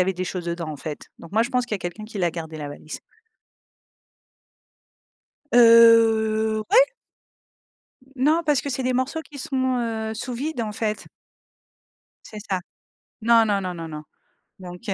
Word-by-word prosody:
avait 190 0 -1
des 185 +1 -3
choses 175 -1 -5
dedans, 170 -2 -4
en 150 - -6
fait. 150 -1 -7
Donc 165 - -12
moi, 220 - +3
je 240 - -4
pense 250 -2 0
qu'il 220 - -3
y - - 0
a - - -13
quelqu'un 175 +5 -6
qui 220 0 -10
l'a 175 -3 +1
gardée 160 -1 -7
la 150 -1 -6
valise. 150 +2 -8 2.5
Heu, 225 -2 +5
ouais. - - +8 1.3
Non, 305 +6 +2
parce 295 -3 +2
que 285 - -6
c'est 260 0 -2
des 255 - 0
morceaux 260 +5 -1
qui 285 -1 -13
sont, 260 -1 -1
heu, 220 -2 -3
sous 240 +3 -5
vide, 280 +2 -3
en 215 -1 -4
fait. 215 0 -3 1.2
C'est 215 - -10
ça. 185 - 0 0.6
Non, 230 0 +5
non, 205 -2 +1
non, 185 -2 -4
non, 165 -1 -7
non. 150 -1 -7 0.6
Donc, 180 -1 -9
heu, 195 - +1
220 Hz, 175 wpm, -23 LUFS, 180-245 Hz, 2.5 s, ouais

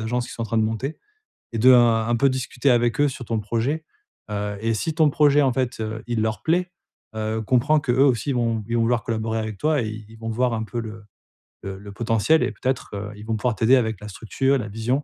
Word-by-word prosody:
agences 120 +2 -2
qui - - -9
sont 115 - -5
en - - -3
train 115 - 0
de 110 - +3
monter, 115 +7 -3 0.6
et - - -2
de, 130 +3 +6
heu, - - +8
un 120 -1 +3
peu 140 +3 +4
discuter 130 0 0
avec 120 0 +2
eux 145 - +5
sur 125 -1 -8
ton 115 -1 -1
projet. 120 +9 -2 0.5
Heu 105 0 -3
et 115 0 +1
si 160 +9 -2
ton 155 -3 +4
projet, 145 0 +4
en 130 -3 +2
fait, 125 -3 -2
heu, 110 0 -4
il 115 -2 -1
leur 110 0 -1
plaît, 180 +3 +1 0.4
heu, 110 +1 -2
comprends 130 +7 +3
que 125 - 0
eux 135 +3 +4
aussi 125 0 +1
ils - - 0
vont 115 -2 0
ils 115 - -2
vont 115 - +2
vouloir 120 0 +1
collaborer 115 -1 -2
avec 110 -2 -4
toi. 150 -3 +1
Et 110 - -3 0.2
ils 110 - -14
vont 115 0 -5
voir 120 +1 +1
un 110 - -2
peu 120 +2 -5
le 110 -1 -8 0.6
le 95 -1 -5
le 100 0 -10
potentiel, 115 +8 +2
et - - 0
peut-être, 125 +5 -2
heu, 105 +1 -5
ils 105 - -11
vont 110 0 -1
pouvoir 115 +1 0
t'aider 115 +6 +4
avec 110 -4 -1
la 105 - -7
structure, 135 +7 0
la 110 - -4
vision. 120 +7 -1
115 Hz, 255 wpm, -23 LUFS, 110-130 Hz, 0.6 s, heu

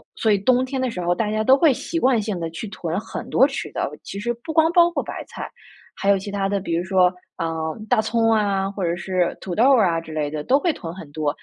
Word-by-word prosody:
所 220 - +1
以 205 - +4
冬 250 +5 +3
天 260 0 -3
的 255 - 0
时 185 -6 -5
候 175 0 +1
大 210 +4 -1
家 215 0 0
都 265 +4 +6
会 295 -1 +5
习 330 +6 -3
惯 255 -4 +3
性 205 -4 -3
地 165 -1 -3
去 165 +7 -6
囤 170 -3 -4
很 215 - -6
多 265 - +5
吃 275 -1 -3
的， - - -1
其 200 - -6
实 240 +1 -1
不 315 +4 -5
光 320 +1 +4
包 345 -1 +5
括 345 - -2
白 - - -6
菜， - - -7 0.5
还 200 - -2
有 200 - +5
其 195 +1 -6
他 195 -1 -1
的， 200 -1 0
比 170 - -3
如 170 - 0
说， 185 -1 +3 0.2
呃， 160 -2 -3
大 230 -1 +3
葱 225 +1 +1
啊， 200 -2 +1
或 200 -1 -5
者 170 0 0
是 180 0 -1
土 180 - -5
豆 255 +7 +5
儿 215 -7 +4
啊 165 -1 0
之 160 - -11
类 150 -1 -2
的 155 - -3
都 265 - +4
会 340 +3 +1
囤 165 - -7
很 160 -6 -10
多， 150 0 -1
200 Hz, 295 characters per minute, -22 LUFS, 175-245 Hz, 0.5 s, 都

